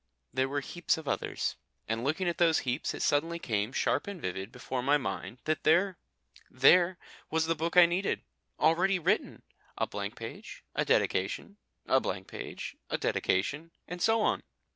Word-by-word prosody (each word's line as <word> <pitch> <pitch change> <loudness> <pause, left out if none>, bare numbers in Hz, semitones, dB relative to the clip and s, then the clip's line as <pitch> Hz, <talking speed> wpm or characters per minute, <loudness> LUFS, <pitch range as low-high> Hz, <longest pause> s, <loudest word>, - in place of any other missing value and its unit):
There 130 +1 +1
were 145 +1 -1
heaps 175 +3 -1
of 160 -2 -8
others. - - -2 0.3
And 115 +1 -1
looking 160 +7 0
at 175 +1 -1
those 165 -2 +5
heaps 125 +3 -1
it - - -3
suddenly 165 +4 +1
came 110 -7 -1
sharp - - 0
and 200 -3 -5
vivid 95 - -4
before 125 0 -4
my 140 +3 +4
mind 130 -2 -4
that 155 0 0
there 175 +4 +3 0.5
there 175 +7 +5 0.3
was 160 0 +1
the 165 - +2
book 165 +2 -2
I 175 - +10
needed, 175 +3 -1 0.4
already 180 +5 +3
written! 185 +5 0 0.3
A - - +1
blank - - -5
page, - - -8
a - - +1
dedication, 205 - 0 0.3
a 130 - +4
blank 95 -6 -3
page, - - -7
a - - 0
dedication, 145 - 0 0.2
and 175 0 -6
so 225 +1 +3
on. - - +1
160 Hz, 170 wpm, -30 LUFS, 130-175 Hz, 0.5 s, I